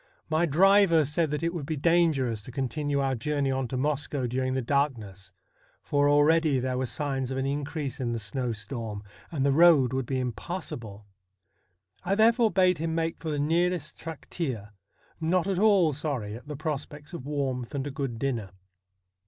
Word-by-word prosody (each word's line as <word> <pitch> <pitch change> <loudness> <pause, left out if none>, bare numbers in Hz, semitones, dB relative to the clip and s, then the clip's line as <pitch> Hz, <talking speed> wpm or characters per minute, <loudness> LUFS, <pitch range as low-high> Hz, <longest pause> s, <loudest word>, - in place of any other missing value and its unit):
My 160 +2 +2
driver 180 0 +5
said 155 +3 0
that 150 +1 -3
it 165 +1 0
would 155 -6 -5
be 160 - -1
dangerous 145 -8 +2
to 115 - -10
continue 140 +3 -1
our 135 -1 +1
journey 140 +2 -1
on 130 -1 -1
to 130 - -3
Moscow 145 -1 -1
during 130 +2 -1
the 130 - 0
darkness, 110 -9 -1 0.5
for 145 0 +2
already 145 -1 +4
there 130 0 -1
were 130 - -1
signs 135 -2 -2
of 130 - -3
an 135 - -1
increase 140 0 -3
in 120 -2 -1
the 120 - -1
snowstorm, 110 -1 -4 0.3
and 140 -5 0
the 140 - +4
road 145 -5 +5
would 130 -2 -1
be 130 -1 -1
impassable. 120 - -5 1.0
I 195 +2 +1
therefore 225 +2 +4
bade 185 -3 +3
him 165 0 -2
make 165 0 -1
for 160 - -5
the 150 - -1
nearest 165 +2 0
trakteer, 140 - -5 0.5
not 170 +2 +1
at 190 -2 0
all 195 -7 +4
sorry 135 -8 -3
at 125 +5 -11
the 150 - -5
prospects 150 +1 -5
of 140 -5 -7
warmth 135 -4 -2
and 135 -1 -2
a 145 - -4
good 135 -4 -4
dinner. 115 -6 -2
145 Hz, 175 wpm, -27 LUFS, 130-160 Hz, 1.0 s, driver